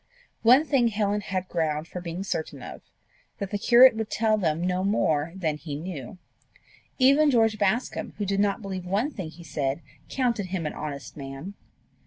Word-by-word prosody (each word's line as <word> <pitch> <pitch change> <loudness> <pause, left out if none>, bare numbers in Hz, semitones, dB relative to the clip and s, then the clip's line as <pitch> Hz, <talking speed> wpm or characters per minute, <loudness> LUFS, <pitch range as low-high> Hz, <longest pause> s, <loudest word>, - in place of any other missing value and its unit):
One 255 +7 +6
thing 265 -6 +3
Helen 210 -1 0
had 185 -2 -3
ground 160 -2 -1
for 180 - -7
being 175 +2 -5
certain 155 -8 -4
of - - -9 0.6
that 200 -1 -5
the 205 - -1
curate 245 +2 +7
would 220 -1 -3
tell 220 -1 +2
them 165 -6 0
no 180 0 0
more 160 -6 +1
than 160 -5 -1
he 150 -2 -6
knew. 155 -1 -7 0.8
Even 280 +3 +5
George 225 -4 +3
Bascombe, 205 +5 0
who 205 - -2
did 195 0 0
not 205 +1 +1
believe 190 -2 -5
one 210 +11 0
thing 185 - -6
he 170 +2 -13
said, 145 -2 -2 0.3
counted 240 -7 0
him 180 -3 -3
an 150 - -3
honest 140 -2 -6
man! 140 +6 -7
190 Hz, 180 wpm, -26 LUFS, 160-220 Hz, 0.8 s, curate